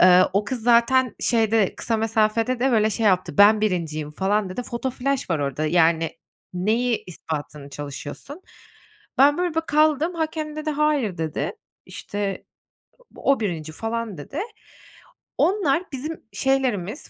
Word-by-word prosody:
Eee, 185 Hz, 0 st, +7 dB
o 200 Hz, +2 st, +1 dB
kız 235 Hz, +2 st, -4 dB
zaten 245 Hz, +1 st, +4 dB
şeyde, 225 Hz, -3 st, +2 dB
kısa 225 Hz, -, -1 dB
mesafede 225 Hz, +2 st, +1 dB
de 270 Hz, -, +3 dB
böyle 215 Hz, -1 st, +3 dB
şey 220 Hz, +1 st, 0 dB
yaptı, 185 Hz, -5 st, +1 dB
ben 210 Hz, +1 st, +7 dB
1.'yim 160 Hz, -7 st, -1 dB
falan 195 Hz, +4 st, 0 dB
dedi, 245 Hz, +7 st, -4 dB
foto 240 Hz, +2 st, -3 dB
flaş 265 Hz, -2 st, -2 dB
var 165 Hz, -, +1 dB
orada 145 Hz, +2 st, -2 dB
yani 165 Hz, 0 st, +3 dB, 0.4 s
neyi 225 Hz, +6 st, 0 dB
ispatını 150 Hz, -4 st, -6 dB
çalışıyorsun. 145 Hz, -, -8 dB, 0.8 s
Ben 285 Hz, +3 st, +5 dB
böyle 355 Hz, -2 st, -1 dB
bir 325 Hz, -, +2 dB
kaldım, 310 Hz, +2 st, +2 dB
hakem 315 Hz, -2 st, -3 dB
dedi 310 Hz, 0 st, -2 dB
hayır 290 Hz, -, 0 dB
dedi. 160 Hz, -2 st, -2 dB, 0.3 s
İşte, 200 Hz, -2 st, -4 dB, 0.7 s
o 275 Hz, -2 st, +1 dB
1. 165 Hz, -7 st, -3 dB
falan 225 Hz, +1 st, -4 dB
dedi. 275 Hz, -, -6 dB, 1.0 s
Onlar 355 Hz, -5 st, +2 dB
bizim 305 Hz, +4 st, -6 dB
şeylerimiz, 260 Hz, -, -1 dB
225 Hz, 135 wpm, -23 LUFS, 180-270 Hz, 1.0 s, Eee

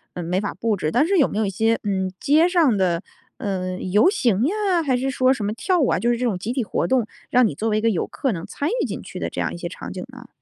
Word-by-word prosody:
呃， 175 Hz, -, -4 dB
没 180 Hz, +3 st, -1 dB
法 205 Hz, -, -3 dB
布 225 Hz, -2 st, 0 dB
置， 155 Hz, -5 st, -2 dB
但 280 Hz, -, +3 dB
是 390 Hz, 0 st, +2 dB
有 285 Hz, -, +4 dB
没 -, -, -4 dB
有 220 Hz, -, +1 dB
一 195 Hz, -, -1 dB
些， 225 Hz, +4 st, +1 dB
嗯， 190 Hz, -2 st, -1 dB
街 315 Hz, +5 st, +4 dB
上 325 Hz, -, +3 dB
的， 180 Hz, -3 st, +1 dB, 0.4 s
呃， 185 Hz, -2 st, -3 dB
游 210 Hz, -, +3 dB
行 235 Hz, -, +1 dB
呀， 385 Hz, -3 st, +1 dB
还 260 Hz, -3 st, +2 dB
是 265 Hz, +2 st, -1 dB
说 255 Hz, 0 st, +3 dB
什 215 Hz, -6 st, -4 dB
么 210 Hz, -, -1 dB
跳 360 Hz, -, 0 dB
舞 275 Hz, -, +3 dB
啊， -, -, +2 dB
就 235 Hz, +7 st, 0 dB
是 235 Hz, -, 0 dB
这 250 Hz, -, -1 dB
种 210 Hz, -7 st, 0 dB
集 205 Hz, +6 st, -4 dB
体 255 Hz, 0 st, -1 dB
活 215 Hz, -, -1 dB
动， 250 Hz, -4 st, +1 dB, 0.2 s
让 250 Hz, -1 st, +4 dB
你 145 Hz, -, -4 dB
作 225 Hz, +6 st, -1 dB
为 215 Hz, -, +1 dB
一 -, -, 0 dB
个 230 Hz, -, +3 dB
游 185 Hz, -, 0 dB
客 265 Hz, -6 st, -2 dB
能 165 Hz, -1 st, -5 dB
参 285 Hz, -, -3 dB
与 -, -, +1 dB
进 -, -, -5 dB
去 -, -, -8 dB
的 -, -, -2 dB
这 -, -, -6 dB
样 -, -, -1 dB
一 -, -, -6 dB
些 170 Hz, 0 st, -5 dB
场 185 Hz, -, -8 dB
景 185 Hz, -, -6 dB
呢？ 250 Hz, -2 st, -12 dB
225 Hz, 330 characters per minute, -22 LUFS, 190-265 Hz, 0.4 s, 有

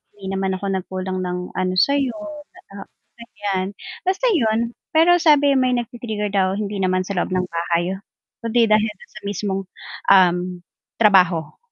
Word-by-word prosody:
hindi 195 Hz, -1 st, -7 dB
naman 190 Hz, -1 st, -1 dB
ako 200 Hz, -, -7 dB
nagkulang 185 Hz, 0 st, -3 dB
ng, 180 Hz, 0 st, -4 dB
ano, 185 Hz, 0 st, -1 dB
sayo, 280 Hz, +3 st, +2 dB, 0.6 s
ah, 200 Hz, -, -9 dB, 0.3 s
ganyan, 200 Hz, -5 st, -3 dB, 0.3 s
basta 380 Hz, +6 st, 0 dB
yun 230 Hz, -2 st, +1 dB, 0.2 s
pero 330 Hz, +2 st, +5 dB
sabi 290 Hz, -3 st, +5 dB
may 255 Hz, -1 st, +2 dB
nagti-trigger 235 Hz, -3 st, -3 dB
daw 190 Hz, -2 st, +2 dB
hindi 205 Hz, -1 st, -3 dB
naman 185 Hz, 0 st, 0 dB
sa 200 Hz, -, -4 dB
loob 180 Hz, -, -1 dB
ng 185 Hz, 0 st, 0 dB
bahay 170 Hz, +2 st, -1 dB, 0.5 s
kundi 230 Hz, 0 st, +3 dB
dahil 215 Hz, 0 st, +3 dB, 0.2 s
sa 215 Hz, -, -12 dB
mismong, 200 Hz, -1 st, -2 dB, 0.5 s
um, 180 Hz, -1 st, +4 dB, 0.4 s
trabaho. 180 Hz, -7 st, +3 dB
200 Hz, 145 wpm, -21 LUFS, 185-235 Hz, 0.6 s, pero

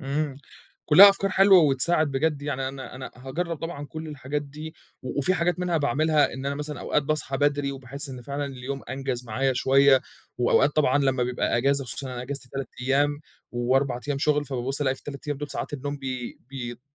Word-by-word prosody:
إمم 140 Hz, +1 st, -2 dB, 0.5 s
كلّها 185 Hz, +7 st, +10 dB
أفكار 195 Hz, 0 st, -1 dB
حلوة 195 Hz, 0 st, +6 dB
وتساعد، 155 Hz, +1 st, +4 dB
بجد 145 Hz, +1 st, -1 dB
يعني 135 Hz, -2 st, -2 dB
أنا 135 Hz, -1 st, -8 dB
أنا 130 Hz, 0 st, -7 dB
هاجرّب 160 Hz, +7 st, -4 dB
طبعًا 155 Hz, -2 st, -6 dB
كلّ 155 Hz, +3 st, -7 dB
الحاجات 145 Hz, 0 st, -4 dB
دي 150 Hz, +3 st, -9 dB, 0.3 s
و 130 Hz, -, -5 dB
وفي 145 Hz, +7 st, +3 dB
حاجات 175 Hz, -1 st, 0 dB
منها 180 Hz, -2 st, 0 dB
باعملها 150 Hz, +1 st, +2 dB
إن 130 Hz, +1 st, -6 dB
أنا 140 Hz, -, -1 dB
مثلًا 150 Hz, -2 st, -5 dB
أوقات 150 Hz, -, 0 dB
باصحى 145 Hz, -1 st, -1 dB
بدري 145 Hz, 0 st, 0 dB
وباحس 135 Hz, +2 st, -2 dB
إن 130 Hz, -2 st, -8 dB
فعلًا 140 Hz, +3 st, -4 dB
اليوم 135 Hz, 0 st, -6 dB
أنجز 130 Hz, -2 st, -3 dB
معايا 130 Hz, +4 st, 0 dB
شوية 135 Hz, +1 st, +4 dB, 0.4 s
وأوقات 130 Hz, +3 st, +3 dB
طبعًا 145 Hz, -2 st, +3 dB
لمّا 135 Hz, -2 st, +1 dB
بيبقى 125 Hz, -1 st, 0 dB
أجازة 135 Hz, +3 st, +2 dB
خصوصًا 135 Hz, +2 st, -3 dB
إن 130 Hz, -, -6 dB
أنا 125 Hz, -1 st, -5 dB
اجازتي 135 Hz, 0 st, -5 dB
3 135 Hz, -1 st, -5 dB
أيام 145 Hz, +3 st, +1 dB, 0.3 s
و4 125 Hz, +1 st, 0 dB
أيام 140 Hz, -1 st, -1 dB
شُغل 150 Hz, +1 st, +1 dB
فبابُص 135 Hz, 0 st, -1 dB
ألاقي 135 Hz, -2 st, +1 dB
في -, -, -14 dB
ال3 140 Hz, -1 st, -9 dB
أيام 145 Hz, -, -1 dB
دول 145 Hz, 0 st, -5 dB
ساعات -, -, -4 dB
النوم 145 Hz, 0 st, -4 dB
بي 130 Hz, -3 st, -6 dB
بيت 120 Hz, -3 st, -6 dB
140 Hz, 200 wpm, -25 LUFS, 130-150 Hz, 0.5 s, كلّها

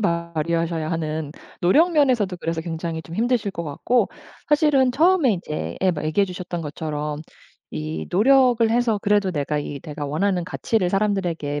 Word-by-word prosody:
발휘하셔야 170 Hz, -2 st, -1 dB
하는 155 Hz, -2 st, -3 dB, 0.3 s
노력 315 Hz, -, +4 dB
면에서도 245 Hz, -, +2 dB
그래서 165 Hz, -1 st, -2 dB
굉장히 165 Hz, 0 st, -4 dB
좀 165 Hz, -, -10 dB
힘드실 230 Hz, -1 st, 0 dB
것 170 Hz, -, -4 dB
같고 170 Hz, -, 0 dB, 0.4 s
사실은 290 Hz, -4 st, +4 dB
처음에 310 Hz, -, +3 dB
이제 155 Hz, -3 st, -5 dB
예 185 Hz, -1 st, +3 dB
얘기해 155 Hz, +6 st, +2 dB
주셨던 180 Hz, -2 st, -5 dB
것처럼 150 Hz, 0 st, -4 dB, 0.5 s
이 75 Hz, +1 st, -4 dB
노력을 245 Hz, +2 st, +4 dB
해서 230 Hz, -2 st, +1 dB
그래도 205 Hz, -2 st, +2 dB
내가 150 Hz, -1 st, -1 dB
이 145 Hz, -1 st, -6 dB
내가 150 Hz, -2 st, -6 dB
원하는 180 Hz, +5 st, 0 dB
가치를 185 Hz, 0 st, -1 dB
사람들에게 180 Hz, -8 st, -1 dB
175 Hz, 355 characters per minute, -22 LUFS, 155-225 Hz, 0.5 s, 노력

